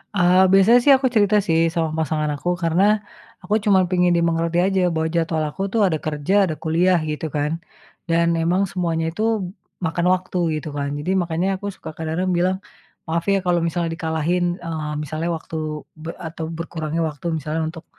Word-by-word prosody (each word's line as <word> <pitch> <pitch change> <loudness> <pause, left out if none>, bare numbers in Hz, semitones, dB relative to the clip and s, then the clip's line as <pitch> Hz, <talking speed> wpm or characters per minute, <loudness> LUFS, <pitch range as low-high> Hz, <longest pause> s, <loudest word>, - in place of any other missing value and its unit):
Eee, 180 0 +5
biasanya 195 +5 +6
sih 280 - +7
aku 265 0 +1
cerita 210 -1 +4
sih 165 -1 +3
sama 165 -2 0
pasangan 155 0 -1
aku, 160 +5 -3
karena 165 +3 +2 0.6
aku 180 - -2
cuma 200 -3 +5
pingin 180 -1 +3
dimengerti 170 0 +1
aja 195 0 +1
bahwa 160 0 0
jadwal 165 -1 0
aku 150 - -7
tuh 225 - +2
ada 160 -4 0
kerja 150 +3 -1
ada 160 - -3
kuliah 175 +3 +3
gitu 150 +1 -4
kan, 150 0 0 0.6
dan 170 0 +3
emang 175 +3 +1
semuanya 165 -3 -1
itu 210 +6 -3 0.6
makan 170 +2 -1
waktu 185 0 -3 0.2
gitu 150 - -9
kan. 140 0 -2
Jadi 150 +6 -2
makanya 170 +1 -1
aku 205 - -8
suka - - -9
kadang-kadang 165 +3 -2
bilang, 185 +2 +1 0.5
"Maaf 165 0 -1
ya 195 - +3
kalau 175 -1 +2
misalnya 170 0 -1
dikalahin, 165 +1 -1 0.2
eee, 155 -2 -3
misalnya 155 +3 -3
waktu 160 - -10 0.5
be 160 - -5 0.2
atau 160 0 -6
berkurangnya 160 -1 -3
waktu 150 +1 -13
misalnya 155 +2 -3
untuk 160 0 -8
165 Hz, 175 wpm, -21 LUFS, 160-180 Hz, 0.6 s, sih